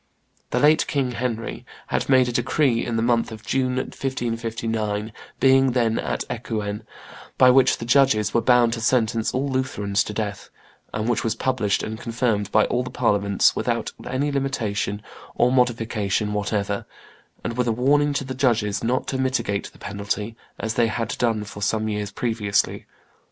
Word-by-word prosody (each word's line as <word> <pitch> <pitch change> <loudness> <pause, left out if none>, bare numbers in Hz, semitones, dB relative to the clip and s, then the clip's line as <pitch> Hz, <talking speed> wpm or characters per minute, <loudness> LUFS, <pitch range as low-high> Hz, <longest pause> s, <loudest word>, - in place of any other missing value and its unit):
The - - -1
late 150 +3 +4
king, 135 -3 0
Henry, 115 -2 -3 0.3
had - - -1
made 130 -2 +5
a - - -1
decree 120 0 +1
in 120 - -3
the 115 - +1
month 115 -1 +1
of 110 - -10
June, 130 -1 0
1559, 115 -5 -3 0.3
being 135 -1 +4
then 115 -3 +1
at - - -2
Ecouen, 110 -3 -4 0.6
by 130 -1 +7
which 130 0 +4
the 115 - -6
judges 125 -5 +3
were 115 - +3
bound 120 -2 +4
to 115 - -4
sentence 115 -2 +1
all 135 +2 -1
Lutherans 105 -7 0
to - - -5
death, 105 -2 -4 0.4
and 110 +1 -2
which 120 -2 +1
was 115 -1 0
published 115 -5 0
and 110 0 -5
confirmed 115 -4 -1
by 110 - +4
all 125 - 0
the 125 - -5
Parliaments, 100 -5 +2
without - - -1 0.2
any 135 +4 -1
limitation 110 -7 -2 0.3
or 125 - +3
modification 115 -4 0
whatever, 100 -1 -2 0.6
and 115 - -3
with 125 0 0
a - - +3
warning 145 +5 +3
to 140 - -1
the 130 0 -5
judges 115 -6 +1
not 125 +3 0
to 130 - -2
mitigate 120 -6 -1
the - - -19
penalty, 105 +2 -4 0.2
as 110 0 -2
they 115 0 +3
had 115 0 -2
done 115 -3 +1
for 105 0 -9
some 110 +2 0
years 105 -1 -3
previously. 110 -4 -1
115 Hz, 170 wpm, -23 LUFS, 105-125 Hz, 0.6 s, by